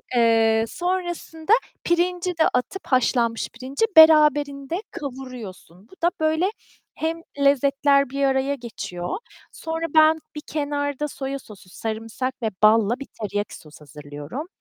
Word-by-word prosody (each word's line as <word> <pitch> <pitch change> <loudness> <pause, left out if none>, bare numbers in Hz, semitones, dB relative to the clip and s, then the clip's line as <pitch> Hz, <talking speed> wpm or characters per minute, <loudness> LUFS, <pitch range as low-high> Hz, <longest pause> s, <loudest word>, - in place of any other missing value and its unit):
Eee, 225 -1 +4
sonrasında 350 - -2 0.3
pirinci 355 +1 +1
de 320 - +4
atıp, 250 +10 -2
haşlanmış 235 -3 +1
pirinci 265 - -2
beraberinde 300 0 +5
kavuruyorsun. 250 - -9
Bu - - -18
da, - - +2
böyle, 315 +3 +2 0.5
hem 325 +1 -2 0.2
lezzetler 280 0 +3
bir 275 +1 -2
araya 270 +1 +1
geçiyor, 220 - -5 0.3
sonra 325 0 -4
ben 315 0 +6 0.2
bir 300 - -5
kenarda 285 -1 -2
soya 275 -1 -5
sosu, 200 -6 -15
sarımsak 225 +5 -4
ve 220 - +1
balla 225 +3 +4
bir 275 - -8
teriyaki 205 0 -3
sos 150 -1 -16
hazırlıyorum. 150 - -8
275 Hz, 125 wpm, -23 LUFS, 225-315 Hz, 0.5 s, ben